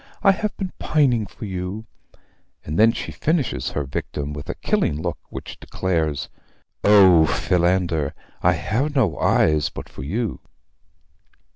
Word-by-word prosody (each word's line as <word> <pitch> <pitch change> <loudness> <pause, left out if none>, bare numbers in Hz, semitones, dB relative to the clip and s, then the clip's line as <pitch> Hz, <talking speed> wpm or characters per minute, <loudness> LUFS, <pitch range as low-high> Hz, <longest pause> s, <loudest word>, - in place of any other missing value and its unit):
I 195 - +7
have 210 +2 -3
been 185 -2 -4
pining 125 -8 +2
for - - -9
you:' 95 +3 -5 0.8
and 75 +2 -3
then 115 +1 +7
she - - -5
finishes 145 - -1
her 75 - -2
victim 70 +2 -4
with 75 -1 -8
a - - -3
killing 75 - 0
look, 85 +1 -3
which - - -8
declares: 80 -6 -1 0.6
'O 95 -6 +7
Philander! 85 0 +1 0.3
I 90 - +4
have 120 - -1
no 105 - +1
eyes 75 -2 +3
but - - -8
for - - -10
you.' 105 - -2
90 Hz, 140 wpm, -22 LUFS, 75-115 Hz, 0.8 s, I